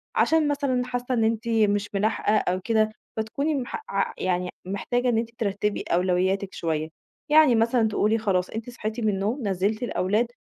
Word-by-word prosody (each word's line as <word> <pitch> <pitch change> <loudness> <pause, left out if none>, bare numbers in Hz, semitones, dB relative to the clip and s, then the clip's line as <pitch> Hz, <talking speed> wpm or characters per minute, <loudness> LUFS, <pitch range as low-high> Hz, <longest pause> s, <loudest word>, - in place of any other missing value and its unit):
عشان 320 -2 +3
مثلًا 280 -3 0
حاسّة 245 0 -3
إن 230 -2 +2
أنتِ 225 +1 0
مش 205 -2 +2
ملاحقة 210 +1 +1
أو 185 -2 0
كده، 220 +1 +2 0.3
فتكوني 280 +8 -1
مح 260 - -4
ع - - 0
يعني 180 -1 -1 0.2
محتاجة 245 +6 -1
إن 235 - +2
أنتِ 230 0 -1
ترتّبي 205 -1 -1
أولوياتِك 185 +2 0
شوية. 160 -1 -2 0.4
يعني 300 -4 +6
مثلًا 230 0 +3
تقولي 215 +1 +1
خلاص 195 -5 0
أنتِ 225 +2 -6
صحيتِ 220 -1 -5
من 220 -2 +1
النوم 210 +5 -1
نزّلتِ 200 +4 0
الأولاد 215 0 +1
220 Hz, 165 wpm, -25 LUFS, 195-245 Hz, 0.4 s, يعني